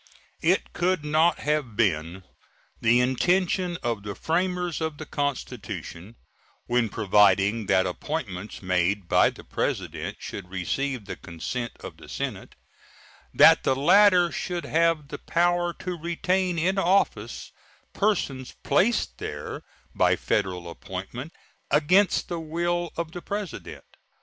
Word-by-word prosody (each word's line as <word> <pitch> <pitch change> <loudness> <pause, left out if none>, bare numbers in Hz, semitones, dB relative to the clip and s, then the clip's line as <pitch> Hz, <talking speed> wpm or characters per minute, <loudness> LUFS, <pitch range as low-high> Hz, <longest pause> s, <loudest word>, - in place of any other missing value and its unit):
It - - +1
could 180 -3 0
not 155 +3 +3
have 150 -7 -1
been 90 -4 0 0.6
the 115 +2 +4
intention 175 +7 +1
of 115 -3 -1
the 100 -1 -6
framers 180 0 -1
of 160 -2 -2
the 155 - -7
Constitution, 110 - -4 0.5
when 120 -2 +1
providing 105 0 +3
that 95 -1 +3
appointments 105 - -5
made 90 +1 0
by - - +5
the - - -12
President - - -3
should 95 -3 -7
receive 115 +7 -2
the - - -6
consent 120 +8 -5
of - - -9
the - - -14
Senate, - - -5 0.8
that - - +7
the 130 - +1
latter 180 +4 +5
should 175 -2 -3
have 165 -2 +1
the 145 - -6
power 175 0 +1
to 180 +1 -5
retain 175 +2 -1
in 185 +4 +1
office 195 +2 0 0.4
persons 140 -11 -1
placed 230 +4 +1
there 75 0 -5 0.3
by - - +3
Federal 90 -4 -1
appointment 95 - -7 0.4
against 180 +7 +3
the 170 - -3
will 170 +2 -2
of 165 -1 -3
the 175 - -7
President. 200 -3 -6
145 Hz, 125 wpm, -26 LUFS, -, 0.8 s, that